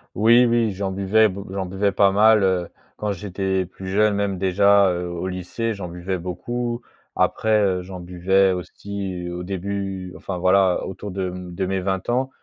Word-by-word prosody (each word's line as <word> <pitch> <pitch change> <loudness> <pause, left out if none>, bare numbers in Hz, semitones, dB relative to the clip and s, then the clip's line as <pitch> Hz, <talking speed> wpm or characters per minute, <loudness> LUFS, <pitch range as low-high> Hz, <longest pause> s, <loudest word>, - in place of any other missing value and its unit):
Oui 115 +4 +6
oui, 115 -3 +2
j'en 95 0 -3
buvais 100 +3 +3
beau 100 +1 -7
j'en 95 -1 -3
buvais 95 +2 0
pas 100 -1 +4
mal, 105 +1 +5
heu, 90 -2 +1 0.3
quand 105 -1 -2
j'étais 95 0 -2
plus 95 +1 -10
jeune 105 +2 +3
même 100 -2 -1
déjà, 100 +1 +4
heu, 90 0 -3
au 85 +1 -4
lycée, 95 +5 -3
j'en 100 -3 -6
buvais 90 +2 -4
beaucoup. 120 +8 -4 0.3
Après, 110 -1 +2
heu, 95 -2 +1
j'en 90 0 -8
buvais 95 +2 +2
aussi 95 0 -5
au 90 0 -5
début, 95 0 -4
enfin 95 -2 -5
voilà 95 0 +3
autour 95 +1 -6
de 95 -1 -2
m 90 -1 -8
de 95 - -1
mes 95 +1 -1
20 95 +2 -2
ans. 130 +2 +1
95 Hz, 185 wpm, -22 LUFS, 90-100 Hz, 0.3 s, Oui